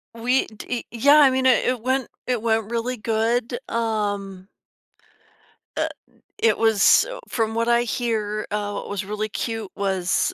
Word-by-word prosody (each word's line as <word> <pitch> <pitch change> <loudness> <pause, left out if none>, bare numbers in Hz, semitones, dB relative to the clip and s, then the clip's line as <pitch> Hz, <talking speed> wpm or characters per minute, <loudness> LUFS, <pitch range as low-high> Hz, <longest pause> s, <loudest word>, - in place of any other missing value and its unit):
We 245 +3 +1
d 230 +3 -6
Yeah, 280 +6 +5
I 280 -3 +7
mean, 260 0 0
i 260 - +7 0.2
it 245 -3 -4
went 260 +1 0 0.2
it 250 -3 -1
went 225 -1 0
really 240 +2 -1
good, 230 +3 -1
um 205 -4 -2 1.3
uh, - - +1 0.5
it 455 - +3
was, 225 - +5
uh, - - -7
from 225 -2 -1
what 230 0 0
I 240 0 +3
hear, 215 -3 -2
uh, 205 0 -2
what - - -6
was 200 -1 -3
really 210 +1 -3
cute 225 -1 -4
was, 190 -4 0
225 Hz, 155 wpm, -23 LUFS, 210-245 Hz, 1.3 s, I